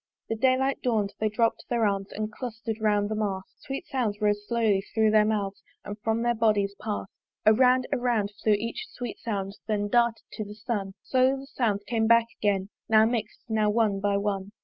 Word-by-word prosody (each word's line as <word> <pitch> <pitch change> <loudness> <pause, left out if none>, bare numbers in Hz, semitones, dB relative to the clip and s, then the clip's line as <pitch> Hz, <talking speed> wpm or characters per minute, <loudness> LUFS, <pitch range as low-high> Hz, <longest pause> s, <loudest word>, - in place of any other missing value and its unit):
The 225 - 0
day 255 +3 +3
light 265 +1 0
dawn'd 215 -5 0
they 215 - +1
dropp'd 225 +1 0
their 235 -2 +2
arms, 195 -1 0
And 215 0 -4
cluster'd 225 -2 -5
round 205 -1 +2
the 215 - -3
mast: 200 -3 -4
Sweet 270 0 -5
sounds 230 -6 -2
rose 205 -1 0
slowly 225 -5 +2
thro' 220 -1 +4
their 215 0 +5
mouths 205 -2 -1 0.2
And 205 - -5
from 225 +2 0
their 240 0 +2
bodies 210 -3 +2
pass'd. 210 -2 -4 0.3
Around, 250 +4 +5
around, 240 -6 +1
flew 215 - +3
each 230 +3 -3
sweet 245 -3 -6
sound, 200 -3 -4
Then 205 -2 0
darted 235 0 +2
to 215 - -4
the 210 0 -9
sun: 205 -3 -3
Slowly 260 +1 +2
the - - -10
sounds 225 -7 -1
came 225 -2 +1
back 230 0 +6 0.2
again 200 -2 +1 0.2
Now 220 0 +6
mix'd, 225 -2 -2
now 215 -2 +2
one 210 -2 +2
by 200 0 +1
one. 200 0 -2
215 Hz, 195 wpm, -27 LUFS, 205-235 Hz, 0.3 s, back